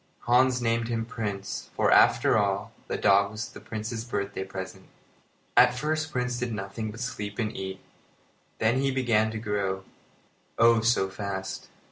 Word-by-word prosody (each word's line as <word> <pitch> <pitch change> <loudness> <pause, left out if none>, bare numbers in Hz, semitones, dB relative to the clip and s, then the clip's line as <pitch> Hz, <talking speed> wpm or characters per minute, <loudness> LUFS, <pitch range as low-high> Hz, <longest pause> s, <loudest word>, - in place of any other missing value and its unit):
Hans 125 +1 +4
named 115 0 +1
him 115 -1 -1
Prince, 105 -4 -4
for, - - +3
after - - +5
all, 100 -2 0 0.2
the - - -2
dog 100 +1 +4
was 110 +1 -5
the - - -11
Prince's 110 +1 -5
birthday 100 -4 -3
present. 95 0 -7 0.7
At 125 0 +6
first 155 +3 -1
Prince 125 -1 -1
did 125 -1 -2
nothing 105 +2 -4
but 110 +2 -9
sleep 105 -5 -4
and 110 -3 -2
eat. 95 0 -5 0.8
Then 120 +4 +2
he 135 - +2
began 120 -5 +2
to 110 - -5
grow, 100 -3 -2 0.7
oh! 115 0 +6
so 115 -4 +3
fast. 95 -1 -5
110 Hz, 155 wpm, -27 LUFS, 100-120 Hz, 0.8 s, At